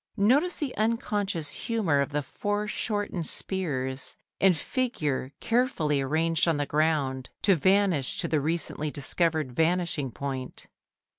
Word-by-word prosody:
Notice 275 - +3
the 285 -4 -3
unconscious 205 -7 -1
humour 195 -12 0
of 140 - -1
the 145 0 -1
foreshortened 205 - -2
spears 130 -8 -1 0.2
and 190 -3 +4
figure 150 - -2
carefully 225 - +1
arranged 160 +5 +1
on 165 -3 +2
the 145 - 0
ground 145 -4 0
to 200 - +5
vanish 185 -5 +2
to - - -2
the 155 -2 +1
recently 155 0 -2
discovered 155 0 0
vanishing 165 -1 0
point. 130 0 -5
165 Hz, 125 wpm, -27 LUFS, 145-205 Hz, 0.2 s, to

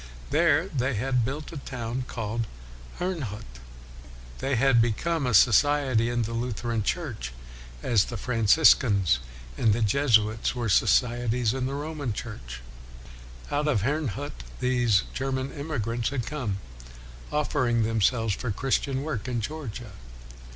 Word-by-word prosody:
There 160 +2 +3
they 135 - -1
had 125 +2 +1
built 140 +6 -4
a 165 - -7
town 125 -2 -4
called 115 0 -3 0.5
Herrnhut. 115 - -4 0.8
They 135 0 0
had 125 -1 +4
become 135 +7 0
a 125 - 0
society 130 +1 +4
in 120 -1 0
the 115 +2 -4
Lutheran 115 -1 -2
WESLEY 105 - +2
303 165 -8 -6
Church, 60 - -7 0.5
as 110 -5 +3
the 120 - -5
Franciscans 110 - +4 0.4
and 110 -2 +4
the 115 +2 0
Jesuits 110 -1 +2
were 120 -3 -2
societies 120 +2 +2
in 130 -1 -1
the 135 - -3
Roman 145 -4 -3
Church. - - -7 0.9
Out 150 +1 0
of 110 -10 +1
Herrnhut 145 0 -2 0.2
these 120 -5 +2
German 130 0 -2
emigrants 120 -6 -2
had 130 -4 -3
come, 125 -10 -3 0.7
offering 130 -6 +1
themselves 115 0 +1
for 120 +5 -4
Christian 135 +4 0
work 135 -7 -4
in 125 -2 -1
Georgia. 120 -3 -6
125 Hz, 135 wpm, -26 LUFS, 110-140 Hz, 0.9 s, had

